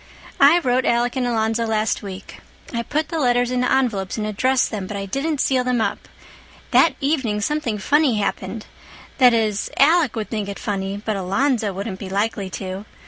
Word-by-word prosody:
I 285 Hz, +5 st, +7 dB
wrote 255 Hz, -6 st, +1 dB
Alec 240 Hz, +1 st, +1 dB
and 255 Hz, -2 st, 0 dB
Alonzo 225 Hz, 0 st, 0 dB
last 220 Hz, 0 st, 0 dB
week. 195 Hz, -2 st, -9 dB, 0.3 s
I 235 Hz, -, -1 dB
put 300 Hz, +6 st, -2 dB
the 325 Hz, -, -2 dB
letters 245 Hz, -2 st, +2 dB
into 250 Hz, 0 st, 0 dB
envelopes 230 Hz, -8 st, 0 dB
and 215 Hz, -, -2 dB
addressed 255 Hz, +5 st, +1 dB
them, 200 Hz, -4 st, -4 dB
but 205 Hz, -, -5 dB
I 195 Hz, -, -4 dB
didn't 280 Hz, +8 st, -2 dB
seal 260 Hz, -2 st, +2 dB
them 250 Hz, -1 st, 0 dB
up. 220 Hz, -, -2 dB, 0.6 s
That 330 Hz, -, +5 dB
evening 270 Hz, -8 st, 0 dB
something 290 Hz, -2 st, -1 dB
funny 285 Hz, +3 st, +2 dB
happened. 210 Hz, +1 st, -3 dB, 0.5 s
That 250 Hz, -2 st, +6 dB
is, 215 Hz, -3 st, 0 dB
Alec 310 Hz, -2 st, +4 dB
would 220 Hz, -2 st, -4 dB
think 210 Hz, -3 st, -3 dB
it 200 Hz, -, -5 dB
funny, 195 Hz, -1 st, -3 dB
but 215 Hz, -2 st, -1 dB
Alonzo 215 Hz, +4 st, 0 dB
wouldn't 195 Hz, 0 st, -5 dB
be 195 Hz, -, -7 dB
likely 200 Hz, 0 st, -1 dB
to. 190 Hz, +1 st, -6 dB
230 Hz, 185 wpm, -21 LUFS, 205-260 Hz, 0.6 s, I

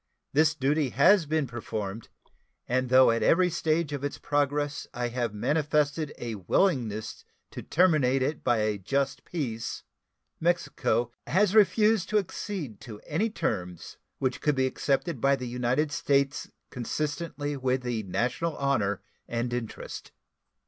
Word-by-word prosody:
This 155 Hz, +2 st, +4 dB
duty 145 Hz, 0 st, +1 dB
has 170 Hz, +6 st, +5 dB
been 155 Hz, -1 st, +1 dB
performed, 110 Hz, -3 st, -5 dB, 0.6 s
and 130 Hz, +1 st, 0 dB
though 130 Hz, -1 st, +7 dB
at 115 Hz, 0 st, 0 dB
every 180 Hz, +10 st, +4 dB
stage 160 Hz, -2 st, 0 dB
of 140 Hz, -1 st, -4 dB
its 145 Hz, -, -3 dB
progress 145 Hz, 0 st, -1 dB
I 120 Hz, 0 st, -1 dB
have 120 Hz, -2 st, -2 dB
manifested 150 Hz, +5 st, 0 dB
a 115 Hz, -1 st, -4 dB
willingness 110 Hz, -, 0 dB, 0.3 s
to -, -, -7 dB
terminate 150 Hz, -7 st, +3 dB
it 145 Hz, +3 st, -2 dB
by 120 Hz, -3 st, +2 dB
a 105 Hz, -1 st, 0 dB
just 135 Hz, +7 st, -1 dB
peace, 120 Hz, -10 st, -4 dB, 0.6 s
Mexico 140 Hz, -8 st, 0 dB, 0.2 s
has 190 Hz, +3 st, +3 dB
refused 215 Hz, -1 st, +4 dB
to 215 Hz, -, +2 dB
accede 185 Hz, -, -4 dB
to 110 Hz, -6 st, -9 dB
any 190 Hz, +10 st, 0 dB
terms 90 Hz, -, -4 dB, 0.2 s
which 130 Hz, -2 st, -1 dB
could 150 Hz, -2 st, +2 dB
be 130 Hz, 0 st, +2 dB
accepted 135 Hz, +1 st, -1 dB
by 140 Hz, 0 st, +4 dB
the 125 Hz, -2 st, -6 dB
United 125 Hz, +5 st, 0 dB
States 140 Hz, 0 st, 0 dB, 0.2 s
consistently 145 Hz, +3 st, -3 dB
with 130 Hz, -1 st, 0 dB
the 120 Hz, -3 st, -1 dB
national 125 Hz, -, -2 dB
honor 120 Hz, -8 st, 0 dB, 0.2 s
and 120 Hz, +1 st, -2 dB
interest. 120 Hz, -3 st, -6 dB
140 Hz, 140 wpm, -28 LUFS, 120-155 Hz, 0.6 s, though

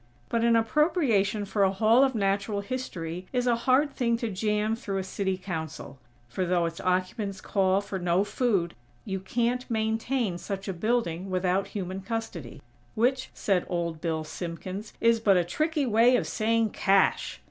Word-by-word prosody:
But 230 Hz, -1 st, 0 dB
an 235 Hz, 0 st, +4 dB
appropriation 225 Hz, -, +2 dB
for 200 Hz, +1 st, -1 dB
a 190 Hz, -1 st, +4 dB
Hall 220 Hz, +6 st, +4 dB
of 265 Hz, -2 st, +1 dB
Natural 200 Hz, 0 st, 0 dB
History 185 Hz, -7 st, -5 dB
is 250 Hz, -1 st, 0 dB
a 240 Hz, -1 st, +3 dB
hard 265 Hz, +4 st, +2 dB
thing 235 Hz, -2 st, +1 dB
to 230 Hz, -2 st, -3 dB
jam 210 Hz, +2 st, 0 dB
through 200 Hz, -4 st, -4 dB
a 190 Hz, -, -1 dB
City 190 Hz, 0 st, -2 dB
Council; 160 Hz, -7 st, -6 dB, 0.3 s
for 130 Hz, +10 st, -2 dB
though 175 Hz, -1 st, +1 dB
its 165 Hz, 0 st, -4 dB
occupants 185 Hz, +2 st, -1 dB
call 195 Hz, -2 st, +1 dB
for 200 Hz, -1 st, -5 dB
no 175 Hz, +2 st, +2 dB
food, 205 Hz, -5 st, 0 dB, 0.3 s
you 190 Hz, 0 st, -3 dB
can't 240 Hz, +6 st, -1 dB
maintain 220 Hz, -2 st, -1 dB
such 195 Hz, +1 st, -5 dB
a 195 Hz, -, -2 dB
building 195 Hz, -2 st, -1 dB
without 185 Hz, +1 st, 0 dB
human 190 Hz, 0 st, -4 dB
custody; 225 Hz, -, -5 dB, 0.3 s
"which," 255 Hz, +4 st, +1 dB
said 190 Hz, -3 st, +1 dB
Old 170 Hz, -3 st, -2 dB
Bill 160 Hz, -2 st, -1 dB
Simpkins, 180 Hz, +6 st, -6 dB
"is 230 Hz, 0 st, +4 dB
but 200 Hz, -4 st, +4 dB
a 175 Hz, -, +3 dB
tricky 305 Hz, -, 0 dB
way 235 Hz, +2 st, +5 dB
of -, -, +1 dB
saying 225 Hz, 0 st, +1 dB
CASH!!" 195 Hz, -1 st, +2 dB
200 Hz, 170 wpm, -27 LUFS, 185-230 Hz, 0.3 s, way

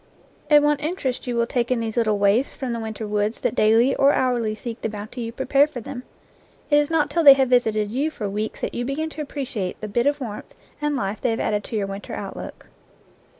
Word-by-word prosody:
And 295 Hz, -1 st, +6 dB
what 295 Hz, -1 st, +2 dB
interest 295 Hz, -6 st, -3 dB
you 245 Hz, -, -1 dB
will 235 Hz, 0 st, +2 dB
take 240 Hz, 0 st, -1 dB
in 250 Hz, -2 st, +1 dB
these 225 Hz, -1 st, -3 dB
little 220 Hz, -3 st, +2 dB
waifs 205 Hz, +6 st, +2 dB
from 255 Hz, -3 st, -3 dB
the 230 Hz, -, -3 dB
winter 220 Hz, 0 st, -5 dB
woods 210 Hz, +2 st, -1 dB
that -, -, 0 dB
daily 230 Hz, +3 st, +4 dB
or 275 Hz, +1 st, +4 dB
hourly 240 Hz, -4 st, 0 dB
seek 230 Hz, +1 st, -7 dB
the -, -, -1 dB
bounty 215 Hz, +4 st, -7 dB
you 230 Hz, 0 st, -4 dB
prepare 270 Hz, +4 st, +3 dB
for 300 Hz, -5 st, -7 dB
them! 250 Hz, +2 st, -7 dB, 0.7 s
It 290 Hz, -, +6 dB
is 295 Hz, 0 st, 0 dB
not 320 Hz, -2 st, +1 dB
till 335 Hz, -, +1 dB
they 280 Hz, -2 st, +11 dB
have 265 Hz, -2 st, +1 dB
visited 215 Hz, -4 st, +2 dB
you 275 Hz, +6 st, 0 dB
for 215 Hz, -9 st, -5 dB
weeks 210 Hz, +2 st, -4 dB
that -, -, -3 dB
you 240 Hz, -, -2 dB
begin 300 Hz, +5 st, -3 dB
to 310 Hz, -, -6 dB
appreciate 265 Hz, -10 st, -4 dB
the 215 Hz, -, -5 dB
bit 235 Hz, +5 st, +1 dB
of 290 Hz, 0 st, +1 dB
warmth 225 Hz, -6 st, -7 dB, 0.3 s
and 295 Hz, -1 st, 0 dB
life 205 Hz, -5 st, -3 dB
they -, -, +1 dB
have 225 Hz, -, -1 dB
added 210 Hz, -1 st, 0 dB
to -, -, -6 dB
your 205 Hz, -2 st, 0 dB
winter 195 Hz, +1 st, -6 dB
outlook. -, -, -7 dB
240 Hz, 235 wpm, -23 LUFS, 215-275 Hz, 0.7 s, they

